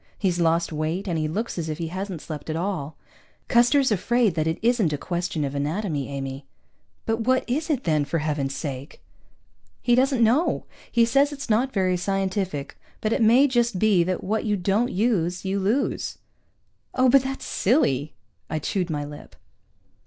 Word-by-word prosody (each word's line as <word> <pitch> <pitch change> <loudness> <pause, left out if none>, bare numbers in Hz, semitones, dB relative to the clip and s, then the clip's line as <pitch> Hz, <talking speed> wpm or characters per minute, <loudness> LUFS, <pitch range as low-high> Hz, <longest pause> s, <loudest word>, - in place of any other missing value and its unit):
He's 180 -3 0
lost 165 0 +2
weight, 160 +6 -2
and 175 - -1
he 155 - 0
looks 205 +4 -3
as 160 -1 -3
if 155 - -3
he 165 -1 -4
hasn't 185 -2 -5
slept 155 -1 -7
at 155 - -1
all. 165 -4 -3 0.5
"Custer's 245 +2 +4
afraid 225 +1 +2
that 155 -1 -1
it 160 - 0
isn't 230 -8 +3
a 145 - -1
question 175 -1 -2
of 135 - -4
anatomy, 150 0 -2
Amy." 135 0 -5 0.6
"But 225 0 0
what 255 +3 +1
is 300 +7 -1
it, 275 -5 0
then, 155 -3 +2
for 165 - -1
heaven's 145 -3 -2
sake?" 140 0 -6 0.8
"He 240 - +1
doesn't 260 -1 +3
know. 250 +10 +2 0.3
He 235 -1 +4
says 275 +5 +3
it's 280 -5 -5
not 245 +5 +2
very 185 -4 +1
scientific, 190 -5 -2 0.2
but 215 +1 0
it - - 0
may 235 +5 +6
just 240 -6 +1
be 200 -3 +4
that 185 0 -2
what 215 +3 -1
you 210 -2 0
don't 200 +6 +1
use, 185 -4 0
you 195 +1 0
lose." 220 +9 -1 0.8
"Oh, 255 0 +4
but 270 +2 +6
that's 265 +1 -5
silly." 155 - +1 0.3
I 155 - -1
chewed 180 +4 -2
my 145 -2 -2
lip. 145 0 -11
190 Hz, 180 wpm, -24 LUFS, 155-235 Hz, 0.8 s, may